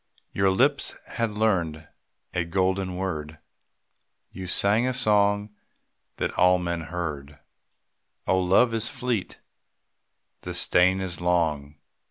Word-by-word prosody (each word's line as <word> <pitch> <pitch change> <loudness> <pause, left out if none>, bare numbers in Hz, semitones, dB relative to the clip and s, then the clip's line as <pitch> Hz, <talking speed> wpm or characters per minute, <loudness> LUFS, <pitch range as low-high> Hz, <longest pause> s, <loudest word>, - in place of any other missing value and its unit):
Your 95 0 +2
lips 135 +9 +2 0.2
had 115 -2 -1
learned 85 -8 0 0.5
a 90 - 0
golden 95 +1 -1
word, 80 -5 -4 0.9
You 95 0 -7
sang 105 +7 +2
a 130 - -1
song 105 -3 +2 0.7
that - - -1
all 90 0 +4
men 85 -1 -3
heard, 75 -4 -5 0.9
Oh, 95 - +2
love 95 +6 +3
is 115 +1 +1
fleet, 120 -6 -3 1.0
the - - -6
strain 95 +2 +3
is 90 -2 -5
long. 80 -5 0
95 Hz, 115 wpm, -25 LUFS, 85-105 Hz, 1.0 s, all